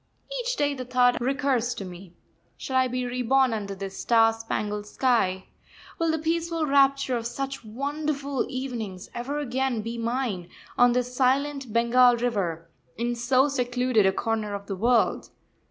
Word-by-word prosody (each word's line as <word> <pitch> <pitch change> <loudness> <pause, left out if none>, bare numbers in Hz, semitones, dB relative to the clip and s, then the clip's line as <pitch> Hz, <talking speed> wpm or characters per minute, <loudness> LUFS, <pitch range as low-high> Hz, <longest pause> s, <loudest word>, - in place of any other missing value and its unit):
Each - - -2
day 290 -6 +1
the 260 -2 -5
thought 250 0 +2
recurs 260 -2 0
to 200 - -6
me: 180 0 -11 0.4
Shall 265 - -5
I 260 0 +4
be 250 0 -2
reborn 250 +1 +2
under 200 -2 -4
this 195 0 -7
star 225 -1 +4
spangled 210 -2 -4
sky? 205 -7 +1 0.5
Will 330 -1 +1
the 320 - +1
peaceful 330 0 -1
rapture 275 -2 +3
of 230 -1 -2
such 270 +2 -5
wonderful 280 +4 -2
evenings 230 -8 -5
ever 265 +5 -4
again 260 -4 -1
be 230 +1 -5
mine, 230 -7 -2 0.3
on 245 0 +5
this 250 0 -1
silent 270 0 +1
Bengal 240 +2 +5
river, 190 -9 -2 0.3
in 240 +2 -1
so 255 +3 +2
secluded 250 -5 +1
a - - +4
corner 215 0 -2
of 200 0 -7
the 195 - -4
world? 230 +4 +2
245 Hz, 155 wpm, -26 LUFS, 225-270 Hz, 0.5 s, on